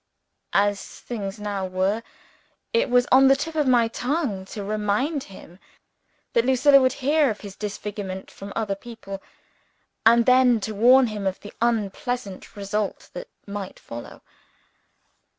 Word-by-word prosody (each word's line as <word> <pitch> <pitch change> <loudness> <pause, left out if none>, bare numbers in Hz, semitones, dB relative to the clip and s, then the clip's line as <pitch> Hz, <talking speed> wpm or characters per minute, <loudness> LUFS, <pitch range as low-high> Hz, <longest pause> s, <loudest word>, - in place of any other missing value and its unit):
As 200 0 +3 0.2
things 210 -3 -5
now 200 -2 -3
were, 190 +4 0 0.7
it 465 - +2
was 245 0 +4
on 265 +1 +7
the 270 - +6
tip 315 +4 -4
of 300 -3 +1
my 240 -3 +4
tongue 245 - -2
to 205 +1 -7
remind 215 +8 -1
him, 185 -2 -14 0.7
that 235 - +3
Lucilla 265 +2 +5
would 255 -1 +3
hear 295 -1 +4
of 210 - -4
his 200 -2 -9
disfigurement 205 -2 -6
from 200 +1 -9
other 215 -3 -1
people; 195 -2 -9 0.8
and 230 +1 +6
then 255 -2 +5
to 220 - -3
warn 250 +5 +6
him 210 -4 -3
of 190 - -2
the 205 - -10
unpleasant 230 -1 -2
result 205 0 -3
that - - -7 0.2
might 200 -2 -6
follow. 120 0 -10
215 Hz, 145 wpm, -24 LUFS, 200-255 Hz, 0.8 s, on